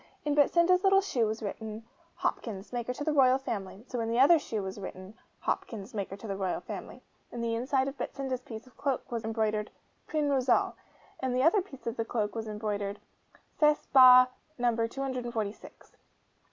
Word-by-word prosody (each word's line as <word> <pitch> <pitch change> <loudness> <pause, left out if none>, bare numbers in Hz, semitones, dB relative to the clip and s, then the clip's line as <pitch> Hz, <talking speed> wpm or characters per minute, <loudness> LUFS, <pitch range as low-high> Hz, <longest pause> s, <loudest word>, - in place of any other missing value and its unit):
In 295 - +1
Betsinda's 340 +5 +4
little 390 0 +6
shoe 245 - 0
was 220 +1 -4
written, 220 +1 -5 0.3
'Hopkins, 210 -1 -3
maker 240 0 -2
to 260 +3 -5
the 310 0 0
Royal 260 -2 +5
Family'; 210 -4 -5
so 245 - -4
in 225 0 -1
the 230 +1 +1
other 310 +5 +7
shoe 220 -8 -4
was 190 +1 -6
written, 190 0 -8 0.3
'Hopkins, 220 +1 -3
maker 200 -2 -4
to 215 - -11
the 195 - -3
Royal 190 -2 -1
Family.' - - -8 0.3
In 240 - -6
the 230 0 -1
inside 260 +3 +1
of 275 +1 -6
Betsinda's 265 -2 -3
piece 225 -2 -9
of 255 - -20
cloak 275 -4 -2
was 235 -1 -3
embroidered, 220 -1 -1 0.4
'PRIN 305 -2 0
ROSAL'; 260 -2 +2 0.5
in 260 -1 -1
the 255 +1 +2
other 340 +6 +5
piece 275 - -13
of 230 0 -4
cloak 210 -3 -1
was 225 -1 -4
embroidered 210 -1 -3 0.6
'CESS 300 -1 +4
BA. 255 -1 +9 0.3
NO. 235 -2 +1
246. 240 -5 -5
240 Hz, 180 wpm, -30 LUFS, 215-270 Hz, 0.6 s, BA